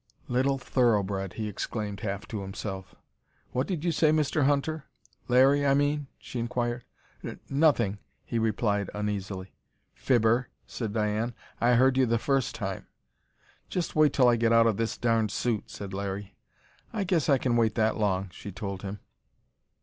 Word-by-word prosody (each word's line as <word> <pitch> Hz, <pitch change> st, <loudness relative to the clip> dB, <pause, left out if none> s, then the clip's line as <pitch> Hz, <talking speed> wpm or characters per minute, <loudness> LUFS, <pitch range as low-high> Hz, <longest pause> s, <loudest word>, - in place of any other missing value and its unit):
"Little 130 Hz, +2 st, +1 dB
thoroughbred!" 100 Hz, -7 st, +1 dB
he 110 Hz, -1 st, -3 dB
exclaimed, 105 Hz, 0 st, -4 dB
half 100 Hz, -1 st, -4 dB
to 105 Hz, -3 st, -4 dB
himself. 95 Hz, -1 st, -6 dB, 0.6 s
"What 130 Hz, +2 st, -1 dB
did 175 Hz, -4 st, -3 dB
you 170 Hz, -, +2 dB
say, 160 Hz, -1 st, +3 dB
Mr. 155 Hz, -2 st, +2 dB
Hunter? 145 Hz, +2 st, 0 dB, 0.4 s
Larry, 135 Hz, +3 st, +5 dB
I 140 Hz, -1 st, +4 dB
mean," 145 Hz, 0 st, +1 dB
she 125 Hz, -, -6 dB
inquired. 120 Hz, 0 st, -2 dB, 0.4 s
"N -, -, -6 dB
nothing," 135 Hz, -9 st, +3 dB, 0.3 s
he 115 Hz, -, -1 dB
replied 105 Hz, -2 st, 0 dB
uneasily. 100 Hz, -2 st, -4 dB, 0.4 s
"Fibber!" 120 Hz, 0 st, +2 dB, 0.2 s
said 115 Hz, -4 st, -4 dB
Diane. 110 Hz, +2 st, -1 dB, 0.2 s
"I 120 Hz, +1 st, +4 dB
heard 130 Hz, +2 st, +4 dB
you 130 Hz, -1 st, +4 dB
the 115 Hz, 0 st, +2 dB
first 135 Hz, +1 st, 0 dB
time!" -, -, -4 dB, 0.8 s
"Just 180 Hz, -2 st, -2 dB
wait 155 Hz, -2 st, +5 dB
till 130 Hz, -3 st, +4 dB
I 120 Hz, -1 st, +5 dB
get 115 Hz, 0 st, +2 dB
out 115 Hz, 0 st, +6 dB
of 110 Hz, -3 st, +2 dB
this 115 Hz, 0 st, -1 dB
darned 115 Hz, -2 st, +2 dB
suit!" 110 Hz, 0 st, -1 dB
said 100 Hz, -1 st, -7 dB
Larry. 100 Hz, 0 st, -4 dB, 0.6 s
"I 210 Hz, -, -1 dB
guess 170 Hz, -7 st, +1 dB
I 140 Hz, -, +6 dB
can 125 Hz, -2 st, 0 dB
wait 115 Hz, -2 st, +2 dB
that 110 Hz, -1 st, +2 dB
long!" 95 Hz, -3 st, 0 dB
she 100 Hz, -, -8 dB
told 95 Hz, 0 st, -5 dB
him. 100 Hz, +1 st, -6 dB
115 Hz, 165 wpm, -28 LUFS, 105-135 Hz, 0.8 s, out